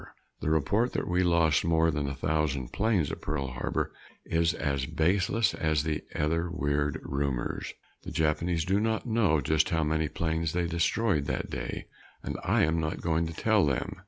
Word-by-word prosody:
The -, -, -2 dB
report 100 Hz, -, +1 dB
that -, -, -2 dB
we 90 Hz, +1 st, +2 dB
lost 85 Hz, -4 st, +3 dB
more 80 Hz, 0 st, +3 dB
than 75 Hz, -2 st, -2 dB
a 70 Hz, -, -4 dB
thousand 75 Hz, -4 st, -1 dB
planes 100 Hz, -8 st, +1 dB
at -, -, -6 dB
Pearl 70 Hz, -2 st, -2 dB
Harbor -, -, -2 dB, 0.3 s
is 80 Hz, -1 st, +1 dB
as 70 Hz, -2 st, -1 dB
baseless 100 Hz, +7 st, +1 dB
as 80 Hz, -3 st, 0 dB
the 80 Hz, -1 st, -2 dB
other 85 Hz, +3 st, 0 dB
weird 75 Hz, -3 st, -1 dB
rumors. 70 Hz, -3 st, -2 dB, 0.3 s
The -, -, -7 dB
Japanese 80 Hz, +2 st, 0 dB
do 95 Hz, +2 st, +2 dB
not 110 Hz, +1 st, 0 dB
know 110 Hz, -10 st, +2 dB
just 80 Hz, 0 st, +2 dB
how 80 Hz, -1 st, +1 dB
many 80 Hz, 0 st, +1 dB
planes 80 Hz, 0 st, -1 dB
they 90 Hz, 0 st, 0 dB
destroyed 85 Hz, 0 st, +1 dB
that -, -, -3 dB
day, -, -, -4 dB, 0.4 s
and -, -, -4 dB
I -, -, +3 dB
am 80 Hz, +1 st, +2 dB
not 80 Hz, -1 st, -2 dB
going 85 Hz, 0 st, 0 dB
to 85 Hz, -, -6 dB
tell 110 Hz, +4 st, +2 dB
them. 70 Hz, -4 st, -1 dB
80 Hz, 180 wpm, -29 LUFS, 75-90 Hz, 0.4 s, lost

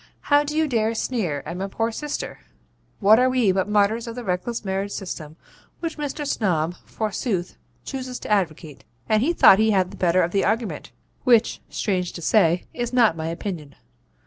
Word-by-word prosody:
How 290 Hz, 0 st, +3 dB
do 300 Hz, +1 st, -4 dB
you 315 Hz, 0 st, +3 dB
dare 225 Hz, -3 st, 0 dB
sneer 185 Hz, -, -2 dB
at 170 Hz, -, -5 dB
my 195 Hz, +1 st, -3 dB
poor 225 Hz, +3 st, -1 dB
sister? 295 Hz, +6 st, -5 dB, 0.6 s
What 215 Hz, +3 st, +6 dB
are 255 Hz, +1 st, +4 dB
we 250 Hz, -6 st, +3 dB
but 190 Hz, +2 st, 0 dB
martyrs 210 Hz, +3 st, +2 dB
of 230 Hz, -, -6 dB
the 245 Hz, -, -6 dB
reckless 205 Hz, +4 st, -3 dB
marriage 195 Hz, +1 st, -2 dB
system 160 Hz, -5 st, -6 dB, 0.4 s
which 330 Hz, -2 st, -4 dB
Mr. 295 Hz, 0 st, -3 dB
Snob, 175 Hz, -, 0 dB
forsooth, 205 Hz, -4 st, -3 dB, 0.3 s
chooses 255 Hz, -2 st, -5 dB
to -, -, -6 dB
advocate?' 165 Hz, -7 st, -1 dB, 0.2 s
And 215 Hz, 0 st, +3 dB
he 295 Hz, +8 st, +2 dB
thought 195 Hz, -, +7 dB
he 220 Hz, 0 st, +4 dB
had 190 Hz, -3 st, +2 dB
the -, -, -11 dB
better 180 Hz, 0 st, +3 dB
of 170 Hz, -, -1 dB
the 195 Hz, -, +1 dB
argument, 225 Hz, +1 st, -2 dB, 0.3 s
which, 235 Hz, -3 st, +3 dB
strange 185 Hz, -4 st, -1 dB
to 170 Hz, -, -7 dB
say, 175 Hz, -3 st, +3 dB
is 240 Hz, -1 st, -3 dB
not 235 Hz, -8 st, +4 dB
my 160 Hz, 0 st, -4 dB
opinion. 165 Hz, -4 st, -5 dB
210 Hz, 185 wpm, -23 LUFS, 180-240 Hz, 0.6 s, thought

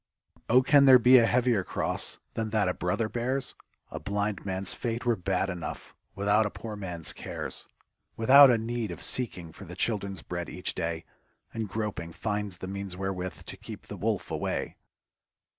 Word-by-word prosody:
Oh, 125 Hz, +2 st, +6 dB
can 140 Hz, +1 st, +6 dB
there 130 Hz, -1 st, +9 dB
be 125 Hz, +1 st, +7 dB
a 115 Hz, -, +4 dB
heavier 120 Hz, -5 st, +2 dB
cross -, -, -1 dB, 0.2 s
Than 110 Hz, -1 st, -2 dB
that 105 Hz, -2 st, +2 dB
a 90 Hz, -, +1 dB
brother 105 Hz, +6 st, -1 dB
bears? 120 Hz, +5 st, -2 dB, 0.4 s
A -, -, -5 dB
blind 100 Hz, 0 st, -2 dB
man's 95 Hz, 0 st, -1 dB
fate 120 Hz, 0 st, -3 dB
were 120 Hz, -1 st, +3 dB
bad 95 Hz, 0 st, -1 dB
enough 90 Hz, -4 st, -6 dB, 0.2 s
Without 100 Hz, +2 st, +3 dB
a -, -, -4 dB
poor 110 Hz, +1 st, -7 dB
man's 90 Hz, -5 st, -4 dB
cares; -, -, -6 dB, 0.5 s
\V 115 Hz, -, -5 dB
ithout 140 Hz, +2 st, +10 dB
a 120 Hz, -, +3 dB
need 115 Hz, -1 st, -3 dB
of 85 Hz, -4 st, -6 dB
seeking 90 Hz, -10 st, 0 dB
for 100 Hz, -, -12 dB
The 90 Hz, 0 st, -9 dB
children's 100 Hz, -, -1 dB
bread -, -, -5 dB
each -, -, -2 dB
day, 80 Hz, 0 st, -3 dB, 0.5 s
And 110 Hz, -2 st, -3 dB
groping, 100 Hz, -5 st, -4 dB
finds 105 Hz, -2 st, -3 dB
the 95 Hz, -, -7 dB
means 100 Hz, -1 st, -5 dB
wherewith 95 Hz, -1 st, -4 dB
To -, -, -6 dB
keep -, -, -9 dB
the -, -, -8 dB
wolf -, -, -2 dB
away. -, -, -2 dB
105 Hz, 180 wpm, -28 LUFS, 95-115 Hz, 0.5 s, ithout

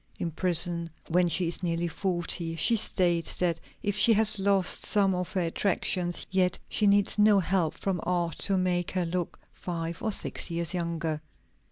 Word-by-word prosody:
In 170 Hz, -, -4 dB
prison, 170 Hz, 0 st, +2 dB, 0.2 s
when 175 Hz, +1 st, +2 dB
she 175 Hz, +1 st, +1 dB
is 170 Hz, -, -4 dB
nearly 170 Hz, -1 st, -1 dB
forty, 175 Hz, -2 st, -2 dB
she 230 Hz, +8 st, +3 dB
states 175 Hz, -5 st, +1 dB
that 170 Hz, -2 st, 0 dB, 0.2 s
if 205 Hz, -1 st, -1 dB
she 225 Hz, +2 st, +6 dB
has 215 Hz, -1 st, +3 dB
lost 195 Hz, -1 st, +3 dB
some 200 Hz, -2 st, +2 dB
of 180 Hz, -1 st, -4 dB
her 190 Hz, -, 0 dB
attractions, 175 Hz, 0 st, -2 dB
yet 185 Hz, -1 st, +1 dB
she 210 Hz, -, +1 dB
needs 200 Hz, +1 st, +2 dB
no 210 Hz, -1 st, +5 dB
help 180 Hz, -3 st, -1 dB
from 190 Hz, -3 st, -3 dB
art 175 Hz, -3 st, -2 dB
to 195 Hz, -2 st, +1 dB
make 180 Hz, -1 st, -1 dB
her 185 Hz, -2 st, -2 dB
look 175 Hz, 0 st, -4 dB, 0.2 s
five 170 Hz, -1 st, -6 dB
or 220 Hz, -, -1 dB
six 195 Hz, -, -2 dB
years 170 Hz, +1 st, -3 dB
younger. 165 Hz, -3 st, -3 dB
180 Hz, 175 wpm, -27 LUFS, 170-195 Hz, 0.2 s, she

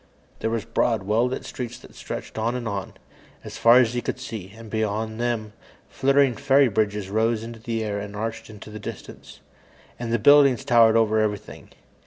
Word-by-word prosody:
There 110 Hz, -, -1 dB
were 115 Hz, -, 0 dB
broad, 115 Hz, -1 st, 0 dB
well 110 Hz, +5 st, +2 dB
lit 125 Hz, -, -5 dB
streets 120 Hz, -3 st, -6 dB
that -, -, -16 dB
stretched -, -, -7 dB
on 115 Hz, +3 st, 0 dB
and 120 Hz, -2 st, -4 dB
on, 100 Hz, -4 st, -5 dB, 0.5 s
as -, -, -9 dB
far 115 Hz, +1 st, +7 dB
as 120 Hz, -2 st, +4 dB
he 120 Hz, -, -1 dB
could 125 Hz, -, -4 dB
see, 110 Hz, -7 st, -7 dB
and 115 Hz, 0 st, -11 dB
beyond 110 Hz, +1 st, -2 dB
them, 115 Hz, -3 st, -2 dB, 0.4 s
flittering 135 Hz, -1 st, +3 dB
fairy 140 Hz, 0 st, +3 dB
bridges 105 Hz, -2 st, -1 dB
rose 110 Hz, +1 st, +1 dB
into 115 Hz, 0 st, -8 dB
the 115 Hz, 0 st, -3 dB
air 100 Hz, -1 st, -3 dB
and 100 Hz, 0 st, -7 dB
arched 115 Hz, +2 st, -5 dB
into 105 Hz, 0 st, -11 dB
the 110 Hz, -, -8 dB
distance. -, -, -10 dB, 0.6 s
And 120 Hz, -1 st, -4 dB
the 120 Hz, -, +3 dB
buildings 135 Hz, +2 st, +5 dB
towered 115 Hz, -4 st, +5 dB
over 110 Hz, -1 st, +3 dB
everything. 105 Hz, -2 st, -3 dB
115 Hz, 190 wpm, -24 LUFS, 110-120 Hz, 0.6 s, far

